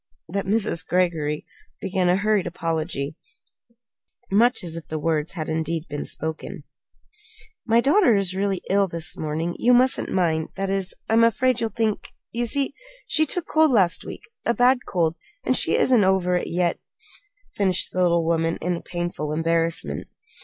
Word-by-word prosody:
that 195 +3 -3
Mrs. 205 -4 +1
Greggory 165 -5 0 0.3
began 190 -2 0
a 180 - +4
hurried 205 -1 +1
apology, 160 -4 -3 1.2
much 235 +4 +3
as 165 -2 -4
if 165 - -7
the 155 - -4
words 155 0 -1
had 155 -5 -4
indeed 160 0 -2
been 145 0 -4
spoken. 160 0 -4 1.0
"My 230 +1 +4
daughter 280 - +4
is 195 -2 0
really 195 -1 -1
ill 200 0 +2
this 165 -2 0
morning. 160 +3 -3
You 245 +1 +5
mustn't 255 +1 +2
mind 160 -4 0
that 195 0 -2
is, 195 -1 -2
I'm 225 +1 +4
afraid 245 +2 +2
you'll 225 - 0
think 220 0 -2 0.2
you 240 +1 -1
see, 280 +3 0 0.3
she 315 0 +2
took 355 +3 -2
cold 315 0 +3
last 190 -9 +3
week; - - -9 0.2
a 235 - +1
bad 250 +1 +3
cold 165 -3 0 0.3
and - - +1
she - - +2
isn't 245 -5 +4
over 190 -1 +2
it, 180 - 0
yet," 175 -1 0 0.7
finished 190 -3 0
the 185 - -1
little 170 -2 +3
woman 165 0 0
in 175 0 -2
painful 175 -4 -4
embarrassment. 165 +1 0
180 Hz, 160 wpm, -23 LUFS, 165-220 Hz, 1.2 s, You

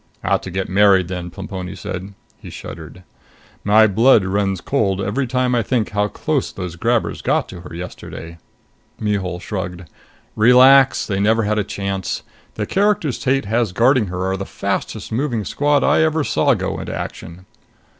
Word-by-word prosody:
"Ought - - +1
to - - -7
get 95 +1 -3
married 95 -2 +4
then," 90 -1 -5
Plemponi 95 0 -7
said. 95 +2 -7 0.2
He - - -10
shuddered. 85 +3 -10 0.6
"My 110 +2 +6
blood 110 +1 +4
runs 95 -1 0
cold 100 -4 0
every 105 +7 -1
time 125 0 0
I 120 - +2
think 115 0 -1
of - - -19
how 105 0 +1
close 150 +5 -2
those 90 -3 -6
grabbers 115 +6 0
got - - 0
to 90 - -9
her 80 -2 -10
yesterday!" 85 -1 -8 0.6
Mihul 95 -4 -2
shrugged. 90 -1 -5 0.5
"Relax! 130 +4 +6
They 95 -2 -2
never 110 +3 +2
had 105 +1 0
a - - +1
chance. 100 -1 -4 0.3
The - - -2
characters 195 - +1
Tate 135 -2 0
has 110 -2 0
guarding 120 +1 +3
her 90 +1 -3
are 95 0 -1
the 95 - -4
fastest - - -4
moving 120 -3 -1
squad 145 +4 +1
I - - +3
ever 160 -1 +2
saw 140 -2 +2
go 95 -2 -3
into - - -5
action." 85 +3 -7
105 Hz, 170 wpm, -19 LUFS, 95-125 Hz, 0.6 s, My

